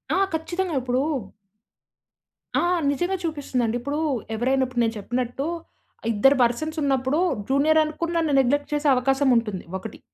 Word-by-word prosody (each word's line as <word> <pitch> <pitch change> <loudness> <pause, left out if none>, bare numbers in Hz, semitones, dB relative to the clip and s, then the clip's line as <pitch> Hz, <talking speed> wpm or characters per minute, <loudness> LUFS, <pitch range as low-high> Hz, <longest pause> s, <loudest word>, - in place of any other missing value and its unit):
ఆ! - - +2 0.2
ఖచ్చితంగా 345 +2 -2
ఇప్పుడు 250 +1 0 1.6
ఆ! - - +2 0.3
నిజంగా 350 +7 -1
చూపిస్తుందండి. 265 -7 -1
ఇప్పుడు 285 +5 -3 0.4
ఎవరైనా 260 +3 +1
ఇప్పుడు 250 -1 -2
నేను 225 -1 0
చెప్పినట్టు,, 245 +5 -3 0.7
ఇద్దరు 270 +7 +4
పర్సన్స్ 310 +7 -1
ఉన్నప్పుడు 270 +1 +1 0.3
జూనియర్ 300 +4 +4
అనుకుని, 310 +2 -3
నన్ను 320 -3 +1
నెగ్లెక్ట్ 285 +3 +1
చేసే 295 0 0
అవకాశముంటుంది 250 -6 +1
ఒకటి. 205 +3 -9
270 Hz, 125 wpm, -24 LUFS, 245-310 Hz, 1.6 s, ఇద్దరు